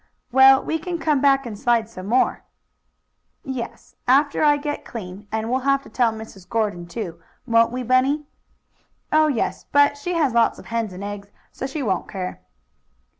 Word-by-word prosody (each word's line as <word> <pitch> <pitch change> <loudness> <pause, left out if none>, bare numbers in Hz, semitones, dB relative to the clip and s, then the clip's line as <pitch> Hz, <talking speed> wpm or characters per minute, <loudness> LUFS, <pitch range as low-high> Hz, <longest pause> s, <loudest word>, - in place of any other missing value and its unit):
"Well, 265 +1 +7
we 320 - -2
can 345 +2 -4
come 300 -4 +1
back 275 -1 +4
and 225 -3 -5
slide 235 -2 +2
some 190 -4 -9
more." 245 +4 +2 1.0
"Yes, 260 -3 -6
after 280 +3 +3
I 295 -1 +5
get 290 0 -4
clean. 200 -2 -8
And 220 0 -2
we'll 260 - +2
have 275 +1 +1
to - - -13
tell 240 -3 +2
Mrs. 220 -4 -11
Gordon, 205 -6 -1
too; 170 -3 -6 0.2
won't 230 -2 +3
we, 250 +1 -3
Bunny?" 255 +5 +2 0.9
"Oh, 310 0 +5
yes. 270 -7 -2
But 285 0 +4
she 355 +4 -3
has 295 -7 +2
lots 235 -1 +3
of - - -12
hens 230 -3 -2
and 185 +2 -8
eggs, 205 0 -6 0.2
so 265 - -5
she 275 +1 -4
won't 190 -6 -1
care." 185 - -5
245 Hz, 175 wpm, -22 LUFS, 215-280 Hz, 1.0 s, Well